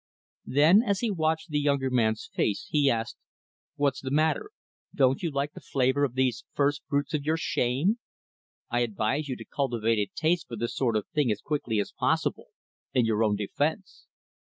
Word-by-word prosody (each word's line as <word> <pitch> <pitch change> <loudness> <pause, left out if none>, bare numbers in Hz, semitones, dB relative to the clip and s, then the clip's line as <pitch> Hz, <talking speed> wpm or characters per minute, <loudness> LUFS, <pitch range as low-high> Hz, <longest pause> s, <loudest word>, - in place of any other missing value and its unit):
Then, 155 +9 +6
as 200 -5 0
he 235 -3 0
watched 160 -2 0
the 150 - +1
younger 140 -2 +1
man's 110 -3 +1
face, 100 - 0
he 145 -3 +4
asked, 115 -2 -1 0.6
"What's 140 -2 0
the 130 - -4
matter, 155 - +1 0.5
don't 135 -1 +3
you 170 - -1
like 140 0 -2
the - - -10
flavor 130 +1 +1
of 130 -3 0
these 130 -2 +1
first 145 +1 +1
fruits 145 +2 -1
of 150 -2 0
your 155 +2 +1
shame? 145 - 0 0.7
I 120 - +1
advise 120 +6 -1
you 130 - -2
to - - -10
cultivate 115 -5 0
a 105 - -1
taste 170 +2 +1
for 120 - -6
this 115 +1 -3
sort 120 -4 +1
of 105 - -4
thing 145 -6 +2
as 105 - -1
quickly 135 -7 -1
as 100 - -2
possible - - -1 0.5
in 125 -2 +4
your 110 0 +2
own 105 -2 +2
defense." 150 - -3
140 Hz, 185 wpm, -27 LUFS, 120-150 Hz, 0.7 s, Then